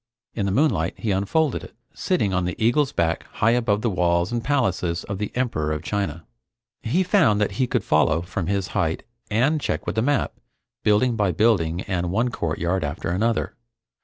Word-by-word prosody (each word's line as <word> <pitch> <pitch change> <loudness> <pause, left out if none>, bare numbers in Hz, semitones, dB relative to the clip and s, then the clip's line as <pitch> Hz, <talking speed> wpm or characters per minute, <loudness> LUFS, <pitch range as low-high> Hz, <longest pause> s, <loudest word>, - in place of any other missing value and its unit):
In 100 -3 -1
the - - 0
moonlight 145 +9 +1
he 110 - -2
unfolded 120 +10 0
it, - - -12 0.2
sitting 135 - 0
on 90 -1 +1
the 90 - -2
eagle's 125 +5 +2
back 85 -1 -1
high 115 - +2
above 110 -3 +1
the 115 - +2
walls 85 0 +1
and 120 -1 -2
palaces 95 -11 0
of 100 -2 -5
the 105 - -3
Emperor 115 -12 -1
of 75 +1 -3
China. 85 -5 -3 0.6
He 160 +12 +1
found 175 - +3
that 105 - +1
he 130 - +2
could 120 -5 0
follow, 80 +1 +2
from 90 -1 -4
his 100 -3 -1
height, 80 -5 -1 0.3
and 135 +9 +2
check - - -2
with - - -2
the 110 - +2
map, 140 +3 +1 0.5
building 115 +4 +3
by 105 -4 +1
building 90 -4 +2
and 90 -3 -2
one 115 +7 +1
courtyard 85 -2 -1
after 75 +4 -3
another. 110 +6 0
100 Hz, 190 wpm, -23 LUFS, 85-120 Hz, 0.6 s, found